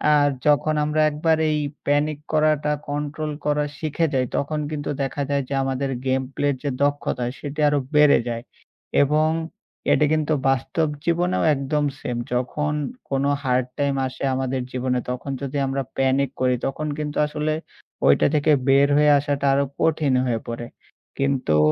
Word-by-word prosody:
আর 145 Hz, -1 st, +4 dB, 0.2 s
যখন 150 Hz, +1 st, +3 dB
আমরা 150 Hz, +1 st, +1 dB
একবার 160 Hz, +2 st, +1 dB
এই 150 Hz, 0 st, +1 dB, 0.3 s
প্যানিক 145 Hz, +1 st, +1 dB
করাটা 155 Hz, -1 st, +2 dB, 0.2 s
কন্ট্রোল 150 Hz, +1 st, -3 dB
করা 150 Hz, 0 st, +1 dB
শিখে 160 Hz, +1 st, 0 dB
যাই। 130 Hz, -1 st, +2 dB
তখন 150 Hz, +2 st, -1 dB
কিন্তু 145 Hz, -2 st, -4 dB
দেখা 135 Hz, +1 st, -3 dB
যায় 140 Hz, -1 st, +1 dB
যে -, -, -3 dB
আমাদের 135 Hz, +1 st, -1 dB, 0.2 s
গেম 130 Hz, 0 st, +2 dB
প্লে 145 Hz, -, 0 dB
এর -, -, -2 dB
যে 145 Hz, -, 0 dB
দক্ষতা 145 Hz, -3 st, 0 dB
সেটি 145 Hz, +1 st, -6 dB
আরো 145 Hz, 0 st, +2 dB, 0.2 s
বেড়ে 150 Hz, -3 st, +6 dB
যায়। 115 Hz, 0 st, -4 dB, 0.6 s
এবং 155 Hz, +2 st, +2 dB, 0.6 s
এটা 150 Hz, -, +4 dB
কিন্তু 155 Hz, 0 st, +1 dB, 0.2 s
বাস্তব 135 Hz, +4 st, 0 dB, 0.2 s
জীবনেও 175 Hz, +2 st, +1 dB
একদম 145 Hz, +2 st, -1 dB
সেম। 125 Hz, -3 st, -3 dB, 0.2 s
যখন 145 Hz, +4 st, -1 dB, 0.4 s
কোন 135 Hz, 0 st, 0 dB, 0.2 s
হার্ড 125 Hz, -1 st, +1 dB
টাইম 140 Hz, -1 st, +1 dB
আসে 130 Hz, -, -8 dB
আমাদের 130 Hz, 0 st, -1 dB
জীবনে। 125 Hz, 0 st, -1 dB
তখন 125 Hz, +2 st, -5 dB
যদি 140 Hz, +1 st, -3 dB
আমরা 135 Hz, +1 st, -1 dB, 0.2 s
প্যানিক 135 Hz, 0 st, +2 dB
করি 125 Hz, -1 st, +3 dB
তখন 150 Hz, +3 st, -3 dB
কিন্তু 150 Hz, -1 st, -3 dB
আসলে 150 Hz, +1 st, -1 dB, 0.5 s
ঐটা 70 Hz, -, +5 dB
থেকে 150 Hz, +1 st, +3 dB, 0.2 s
বের 140 Hz, +1 st, +6 dB
হয়ে 150 Hz, 0 st, +5 dB
আসাটা 140 Hz, -1 st, -2 dB
আরও 140 Hz, +1 st, +2 dB, 0.2 s
কঠিন 155 Hz, -4 st, +2 dB
হয়ে 120 Hz, -3 st, 0 dB
পড়ে। 120 Hz, 0 st, -5 dB, 0.5 s
কিন্তু 135 Hz, -, +1 dB
145 Hz, 160 wpm, -23 LUFS, 135-150 Hz, 0.6 s, বেড়ে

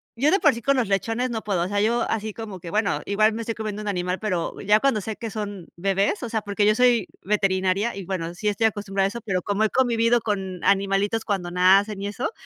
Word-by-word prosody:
yo 280 Hz, +6 st, +2 dB
de 390 Hz, -, +4 dB
por 295 Hz, -7 st, +4 dB
sí 235 Hz, -, -7 dB
con 275 Hz, +3 st, +2 dB
los 245 Hz, -4 st, +1 dB
lechones 225 Hz, +5 st, 0 dB
no 225 Hz, -2 st, -4 dB
puedo, 190 Hz, -5 st, 0 dB
o -, -, -3 dB
sea, 205 Hz, +1 st, 0 dB
yo 230 Hz, +2 st, +2 dB
así 220 Hz, -1 st, -2 dB
como 210 Hz, -4 st, -7 dB
que, 170 Hz, -, -8 dB
bueno, 205 Hz, +2 st, 0 dB
igual 215 Hz, +2 st, +2 dB
me 225 Hz, -, -4 dB
estoy 230 Hz, 0 st, -3 dB
comiendo 215 Hz, -1 st, -4 dB
un 210 Hz, -, -6 dB
animal, 180 Hz, -1 st, -1 dB
pero, 185 Hz, -6 st, -2 dB
ya 210 Hz, +1 st, +4 dB
cuando 225 Hz, -4 st, +1 dB
sé 220 Hz, +2 st, -5 dB
que 230 Hz, -, -5 dB
son 205 Hz, -4 st, -6 dB
bebés, 195 Hz, -, 0 dB
o 240 Hz, -, -4 dB
sea, 220 Hz, -1 st, -1 dB
porque 205 Hz, 0 st, 0 dB
yo 210 Hz, -, +5 dB
soy 240 Hz, -4 st, +3 dB
veterinaria. 195 Hz, +1 st, 0 dB
Y, 195 Hz, -2 st, -7 dB
bueno, 170 Hz, -2 st, -3 dB
sí 205 Hz, +4 st, -4 dB
estoy 210 Hz, +2 st, +1 dB
acostumbrada 200 Hz, -2 st, -1 dB
a -, -, -3 dB
eso, 235 Hz, +4 st, -6 dB
pero 185 Hz, -4 st, -1 dB
como 205 Hz, +2 st, 0 dB
he -, -, +1 dB
convivido 235 Hz, -1 st, +2 dB
con 190 Hz, -4 st, -3 dB
animalitos 200 Hz, +3 st, +1 dB
cuando 190 Hz, -4 st, -2 dB
nacen 195 Hz, +3 st, +3 dB
y 200 Hz, -, -2 dB
eso, 240 Hz, -, -3 dB
205 Hz, 250 wpm, -24 LUFS, 195-225 Hz, -, yo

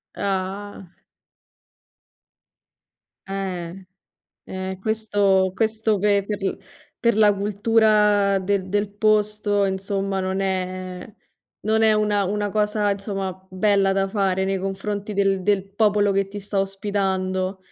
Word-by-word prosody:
Ah. 195 Hz, -1 st, -4 dB, 2.4 s
Eh. 185 Hz, -3 st, -4 dB, 0.8 s
Eh, 190 Hz, 0 st, -4 dB
questo 205 Hz, -3 st, +2 dB
questo 220 Hz, -1 st, 0 dB
pe 200 Hz, 0 st, +3 dB
per 205 Hz, 0 st, -3 dB, 0.6 s
per 235 Hz, -2 st, +2 dB
la 210 Hz, -1 st, +5 dB
cultura 205 Hz, -1 st, +3 dB
del 190 Hz, 0 st, -1 dB
del 205 Hz, +1 st, 0 dB
posto 210 Hz, -1 st, +2 dB
insomma 195 Hz, 0 st, -2 dB
non 190 Hz, +1 st, -2 dB
è 185 Hz, 0 st, -3 dB, 0.5 s
non 220 Hz, +1 st, +2 dB
è 220 Hz, -, +5 dB
una 210 Hz, -1 st, +1 dB
una 205 Hz, +2 st, -1 dB
cosa 210 Hz, 0 st, +1 dB
insomma 195 Hz, -2 st, -5 dB
bella 195 Hz, 0 st, +2 dB
da 195 Hz, 0 st, +1 dB
fare 190 Hz, -2 st, 0 dB
nei 195 Hz, 0 st, 0 dB
confronti 195 Hz, +2 st, -4 dB
del 195 Hz, -1 st, +1 dB
del 200 Hz, -1 st, +1 dB
popolo 205 Hz, -1 st, +3 dB
che 195 Hz, 0 st, +1 dB
ti 205 Hz, +1 st, -6 dB
sta 200 Hz, 0 st, -2 dB
ospitando. 190 Hz, -1 st, -2 dB
200 Hz, 115 wpm, -23 LUFS, 190-210 Hz, 2.4 s, la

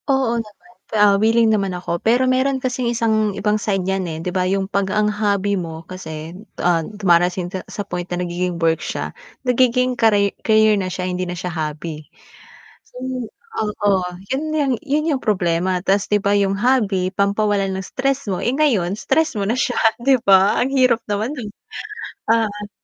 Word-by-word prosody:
Oo 265 Hz, -3 st, +2 dB
naman, 205 Hz, -5 st, -16 dB, 0.2 s
ah, 205 Hz, -1 st, +6 dB
wiling 225 Hz, 0 st, +4 dB
naman 195 Hz, -3 st, 0 dB
ako, 170 Hz, -1 st, -3 dB
pero 245 Hz, +3 st, +3 dB
meron 260 Hz, +1 st, +2 dB
kasing 255 Hz, -2 st, -2 dB
isang 220 Hz, -3 st, +1 dB
ibang 210 Hz, 0 st, 0 dB
side 195 Hz, -3 st, -1 dB
yan 190 Hz, -2 st, -1 dB
eh, 160 Hz, -, -5 dB
'di 165 Hz, +3 st, -4 dB
ba 185 Hz, 0 st, +1 dB
yung 195 Hz, 0 st, 0 dB
pag 200 Hz, 0 st, -1 dB
ang 210 Hz, +1 st, +2 dB
hobby 205 Hz, -1 st, 0 dB
mo 165 Hz, -4 st, -4 dB
kasi, 160 Hz, -3 st, -7 dB, 0.2 s
ah, 175 Hz, -2 st, +2 dB
dumarating 180 Hz, -1 st, +1 dB
ka 190 Hz, -, -3 dB
sa 205 Hz, -, -5 dB
point 180 Hz, -2 st, -5 dB
na 175 Hz, 0 st, -2 dB
nagiging 175 Hz, 0 st, -2 dB
work 165 Hz, -1 st, +1 dB
siya, -, -, -4 dB, 0.3 s
nagiging 250 Hz, 0 st, +2 dB
kari 205 Hz, -4 st, +3 dB
career 220 Hz, -1 st, +4 dB
na 185 Hz, -, -3 dB
siya 180 Hz, 0 st, -4 dB
hindi 185 Hz, 0 st, -2 dB
na 175 Hz, -, -4 dB
siya 180 Hz, -1 st, -4 dB
hobby. 155 Hz, 0 st, -4 dB, 0.8 s
So, -, -, -22 dB, 0.7 s
oo 205 Hz, -3 st, +1 dB, 0.2 s
yun 300 Hz, +4 st, -2 dB
yung 290 Hz, -4 st, +1 dB
yun 305 Hz, +3 st, 0 dB
yung 260 Hz, -, -8 dB
problema, 180 Hz, -2 st, +1 dB
tas 195 Hz, +2 st, +1 dB
'di 210 Hz, 0 st, +1 dB
ba 200 Hz, +1 st, +2 dB
yung 195 Hz, 0 st, +1 dB
hobby 210 Hz, -7 st, +2 dB
pampawalan 200 Hz, 0 st, 0 dB
ng 190 Hz, 0 st, -4 dB
stress 275 Hz, -2 st, -2 dB
mo, 190 Hz, -, 0 dB
eh 240 Hz, -, +1 dB
ngayon 250 Hz, -, +2 dB
stress 270 Hz, +11 st, +1 dB
mo 200 Hz, -, -1 dB
na 230 Hz, -, +1 dB
siya 255 Hz, -1 st, 0 dB, 0.2 s
'di 265 Hz, -2 st, +4 dB
ba? 195 Hz, 0 st, +5 dB
Ang 250 Hz, -, +1 dB
hirap 255 Hz, -3 st, +4 dB
naman 210 Hz, +5 st, -1 dB
non. 245 Hz, -8 st, -6 dB, 0.8 s
Ah 210 Hz, -2 st, 0 dB
200 Hz, 180 wpm, -20 LUFS, 185-230 Hz, 0.8 s, ah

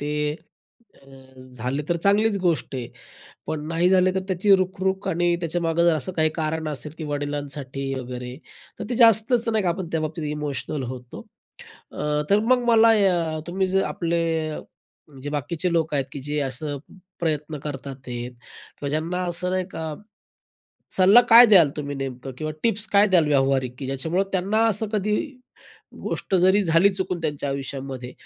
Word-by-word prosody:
ते 150 Hz, +1 st, -1 dB, 0.7 s
अ, 130 Hz, -1 st, -17 dB
झाले 125 Hz, +5 st, -3 dB
तर 175 Hz, -, +1 dB
चांगलीच 205 Hz, +1 st, +3 dB
गोष्ट 170 Hz, -6 st, 0 dB
आहे. 125 Hz, -2 st, -4 dB, 0.6 s
पण 155 Hz, -1 st, -4 dB
नाही 165 Hz, +2 st, +2 dB
झाले 185 Hz, 0 st, +4 dB
तर 190 Hz, -, 0 dB
त्याची 195 Hz, +2 st, +4 dB
रुखरुख 190 Hz, +1 st, -2 dB
आणि 175 Hz, -1 st, +1 dB
त्याच्यामागे 170 Hz, 0 st, 0 dB
जर 170 Hz, -2 st, +4 dB
असं 155 Hz, +5 st, -4 dB
काही 155 Hz, -2 st, +2 dB
कारण 160 Hz, 0 st, -2 dB
असेल, 145 Hz, 0 st, -4 dB
की 160 Hz, -, -5 dB
वडिलांसाठी 145 Hz, -2 st, -4 dB
वगैरे 125 Hz, -1 st, -6 dB, 0.4 s
तर 210 Hz, -, -5 dB
ते 245 Hz, -, -1 dB
जास्तच 230 Hz, 0 st, +4 dB
नाही 220 Hz, -2 st, +1 dB
का, -, -, +2 dB
आपण 175 Hz, 0 st, -4 dB
त्याबाबतीत 155 Hz, 0 st, -2 dB
इमोशनल 150 Hz, -1 st, -4 dB
होतो. 125 Hz, -1 st, -10 dB, 0.7 s
अ, -, -, -12 dB, 0.3 s
तर 200 Hz, -, +5 dB
मग 255 Hz, -1 st, +4 dB
मला 230 Hz, -1 st, +6 dB, 0.5 s
अ, -, -, -4 dB
तुम्ही 190 Hz, +2 st, 0 dB
जर 190 Hz, +1 st, +1 dB
आपले 170 Hz, -1 st, -1 dB, 1.0 s
जे 145 Hz, -, -4 dB
बाकीचे 155 Hz, +4 st, -2 dB
लोक 160 Hz, -2 st, 0 dB
आहेत 140 Hz, -2 st, +1 dB
की 145 Hz, -, -6 dB
जे 145 Hz, +2 st, -3 dB
असं 145 Hz, +3 st, -4 dB, 0.4 s
प्रयत्न 155 Hz, -2 st, -2 dB
करतात 140 Hz, -2 st, -6 dB
ते 120 Hz, -1 st, -4 dB
किंवा 125 Hz, +3 st, -10 dB
ज्यांना 165 Hz, +5 st, -2 dB
असं 175 Hz, +1 st, +1 dB
नाही 185 Hz, 0 st, 0 dB
का, 160 Hz, -4 st, -5 dB, 1.0 s
सल्ला 195 Hz, +5 st, +7 dB
काय 235 Hz, +2 st, +10 dB
द्याल 185 Hz, -9 st, +6 dB
तुम्ही 145 Hz, -1 st, -4 dB
नेमकं? 135 Hz, -1 st, -6 dB
किंवा 155 Hz, 0 st, -3 dB
टिप्स 220 Hz, -2 st, 0 dB
काय 200 Hz, +1 st, +6 dB
द्याल 175 Hz, -5 st, +4 dB
व्यावहारिक? 135 Hz, -3 st, +1 dB
की 135 Hz, -, -5 dB
ज्याच्यामुळं 160 Hz, +8 st, -1 dB
त्यांना 200 Hz, +4 st, +1 dB
असं 220 Hz, 0 st, -1 dB
कधी 210 Hz, 0 st, 0 dB, 0.9 s
गोष्ट 195 Hz, -, -3 dB
जरी 190 Hz, +3 st, +4 dB
झाली 165 Hz, +3 st, +4 dB
चुकून 185 Hz, -2 st, -2 dB
त्यांच्या 145 Hz, -2 st, -2 dB
आयुष्यामध्ये, 135 Hz, -2 st, -5 dB
160 Hz, 160 wpm, -23 LUFS, 140-190 Hz, 1.0 s, काय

